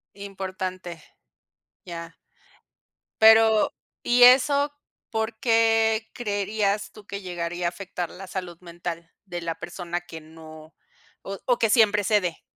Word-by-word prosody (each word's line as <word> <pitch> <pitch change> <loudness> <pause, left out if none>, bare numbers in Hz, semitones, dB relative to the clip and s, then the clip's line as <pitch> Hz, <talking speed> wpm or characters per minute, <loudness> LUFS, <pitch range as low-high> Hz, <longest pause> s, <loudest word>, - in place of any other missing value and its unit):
importante. 185 -3 -6 0.8
Ya. 170 -1 -8 1.1
Pero, 220 -1 +6 0.3
¿y 245 0 +4
eso? 280 +3 +6 0.4
¿Por 220 0 -2
qué 225 -2 +2
creerías 205 -2 -2
tú 215 -2 -15
que 200 0 -6
llegaría 175 -1 -3
a - - +2
afectar 180 -2 -6
la 195 +1 -10
salud 180 -2 -6
mental 170 -1 -7
de 175 -3 -6
la 165 -1 -4
persona 175 -1 -5
que 165 -2 -10
no 155 0 -14 0.5
o 195 0 -6
o 245 -2 +2
que 225 - +2
siempre 210 -3 +4
cede? 185 -5 0
195 Hz, 125 wpm, -25 LUFS, 175-220 Hz, 1.1 s, Pero